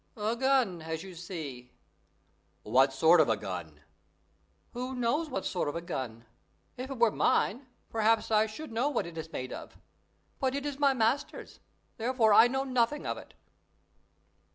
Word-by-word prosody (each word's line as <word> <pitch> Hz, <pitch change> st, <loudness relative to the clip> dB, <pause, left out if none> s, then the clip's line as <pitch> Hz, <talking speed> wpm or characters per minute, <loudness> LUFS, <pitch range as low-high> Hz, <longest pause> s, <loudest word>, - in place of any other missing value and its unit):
"A 215 Hz, +2 st, -1 dB
gun, 255 Hz, -9 st, +2 dB
as 160 Hz, 0 st, -4 dB
you 190 Hz, -1 st, -9 dB
see." 155 Hz, -8 st, -7 dB, 0.9 s
"What 130 Hz, +5 st, +4 dB
sort 160 Hz, +5 st, +5 dB
of 145 Hz, -, +2 dB
a 110 Hz, -, +2 dB
gun?" 85 Hz, -7 st, -7 dB, 0.9 s
"Who 255 Hz, +2 st, -4 dB
knows 255 Hz, +7 st, 0 dB
what 195 Hz, -8 st, -3 dB
sort 180 Hz, -, -1 dB
of 145 Hz, -, -5 dB
a 170 Hz, -, -3 dB
gun? 120 Hz, -7 st, -5 dB, 0.5 s
If 255 Hz, +2 st, -6 dB
it 270 Hz, -, -5 dB
were 235 Hz, -2 st, +4 dB
mine, 250 Hz, +6 st, +1 dB, 0.2 s
perhaps 225 Hz, 0 st, +2 dB
I 215 Hz, 0 st, +4 dB
should 230 Hz, +6 st, -8 dB
know 240 Hz, +6 st, +1 dB
what 260 Hz, -, -1 dB
it 170 Hz, -1 st, -9 dB
is 160 Hz, 0 st, -6 dB
made 130 Hz, 0 st, -5 dB
of; -, -, -9 dB, 0.6 s
but 265 Hz, 0 st, 0 dB
it 280 Hz, 0 st, -3 dB
is 285 Hz, -1 st, -4 dB
my 280 Hz, -2 st, +4 dB
master's, 250 Hz, +5 st, -1 dB, 0.4 s
therefore 230 Hz, -2 st, +3 dB
I 225 Hz, +3 st, +8 dB
know 265 Hz, +2 st, -1 dB
nothing 255 Hz, +2 st, 0 dB
of -, -, -1 dB
it." -, -, -15 dB
220 Hz, 170 wpm, -30 LUFS, 160-255 Hz, 0.9 s, I